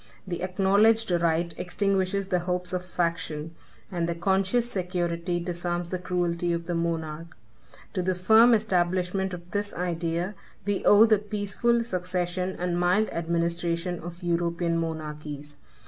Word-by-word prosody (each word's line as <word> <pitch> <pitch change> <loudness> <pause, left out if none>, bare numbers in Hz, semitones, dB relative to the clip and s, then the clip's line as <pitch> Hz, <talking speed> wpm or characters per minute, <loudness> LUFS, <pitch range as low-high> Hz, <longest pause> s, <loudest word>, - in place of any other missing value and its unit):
The 175 -3 -4
acknowledged 200 +4 +3
right 170 0 +1
extinguishes 195 +1 0
the 180 - +2
hopes 180 0 -2
of 180 0 -1
faction, 170 -3 -2 0.4
and 170 -2 -1
the 170 - -1
conscious 195 +6 +1
security 175 -3 -2
disarms 175 0 -3
the 185 - -2
cruelty 175 -1 -1
of 170 0 -3
the 175 - -2
monarch. 165 -1 -3 0.6
To 185 - 0
the 185 +1 0
firm 220 +6 +6
establishment 185 -2 0
of 175 0 -8
this 205 0 -2
idea 175 +1 -2 0.3
we 205 -1 0
owe 205 +2 +8
the 215 -2 +4
peaceful 210 +3 0
succession 180 -2 -2
and 175 0 -1
mild 185 +5 +2
administration 170 +1 -1
of 175 +2 -9
European 170 0 0
monarchies. 150 -2 -5
175 Hz, 135 wpm, -27 LUFS, 170-190 Hz, 0.6 s, owe